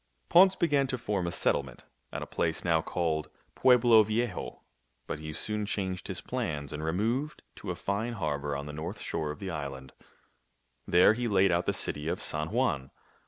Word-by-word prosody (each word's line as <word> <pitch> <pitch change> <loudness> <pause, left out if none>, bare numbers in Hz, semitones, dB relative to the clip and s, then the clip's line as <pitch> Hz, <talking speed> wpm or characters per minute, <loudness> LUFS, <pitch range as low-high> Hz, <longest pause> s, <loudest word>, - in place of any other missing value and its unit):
Ponce 190 +2 +7
began 145 -5 +2
to 130 - -2
form 105 -6 -2
a - - -2
settlement 70 -6 -1 0.3
at - - -4
a - - -5
place 80 +1 -1
now 80 -2 +3
called 80 -3 -1 0.2
Pueblo 120 -3 +6
Viejo; 110 +2 -2 0.4
but 75 - -4
he 80 0 -6
soon 105 +6 -2
changed 95 -3 -3
his - - -4
plans 70 -3 -3
and 75 +1 -5
removed 115 - -1
to - - -7
a - - -1
fine 105 +5 -2
harbor 75 -7 -2
on 70 +1 -4
the 75 - -7
north 80 +6 -5
shore 75 - -3
of 75 - -5
the 95 -1 -5
island. 70 -4 -6 0.9
There 90 +4 +6
he 120 +1 -2
laid 100 -3 +4
out 85 0 +1
the - - +4
city 75 +1 -2
of - - -1
San 75 +1 -1
Juan. 65 -4 0
90 Hz, 185 wpm, -29 LUFS, 75-110 Hz, 0.9 s, Ponce